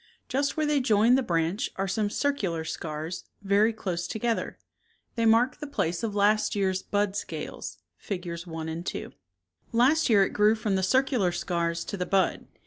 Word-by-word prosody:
Just 280 +4 -1
where 310 - +2
they 295 -1 +2
join 225 -1 +4
the 265 - +4
branch 175 +2 0
are 195 +1 -1
some 205 +2 0
circular 205 - -1
scars, 155 +2 -5 0.2
very 205 +3 +4
close 180 -6 -3
together. 225 +4 -2 0.6
They 230 -2 +1
mark 240 +3 +4
the 295 - -6
place 170 - -1
of 215 -3 -3
last 210 +2 +3
year's 190 -2 0
bud 205 -1 -1
scales - - -5 0.2
(Figures 175 -3 -5
I 165 -1 -5
and 160 +1 -4
2). - - -5 0.6
Last 260 +7 +3
year 205 -4 +6
it - - -2
grew 210 +1 +4
from 215 -3 -1
the 190 - +1
cir 260 +8 +4
cular 225 -10 0
scars 170 -1 -1
to 200 - -5
the 180 - -2
bud. 195 -1 +1
205 Hz, 180 wpm, -27 LUFS, 175-230 Hz, 0.6 s, year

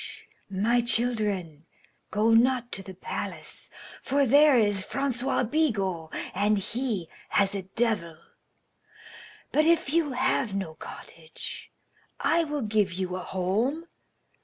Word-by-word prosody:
My 215 +6 +2
children, 210 -10 0 0.4
go 220 +2 +2
not 245 +1 +3
to 195 - -2
the 190 -1 -10
palace, - - -4 0.3
for 280 +1 +2
there 285 +2 +6
is 205 -4 +3
Francois 260 +3 0
Bigot, 205 - 0 0.2
and 205 +2 +2
he 210 -2 -2 0.2
has 200 -1 +3
a 200 - -2
devil. 190 -4 -1 1.3
But 305 - +3
if 325 -3 +3
you 320 -5 +2
have 255 -4 0
no 190 -5 -3
cottage, 160 0 -9 0.5
I 335 0 +2
will 295 -3 -3
give 210 -3 +1
you 185 0 -3
a - - -3
home. 205 - -1
220 Hz, 120 wpm, -27 LUFS, 190-265 Hz, 1.3 s, there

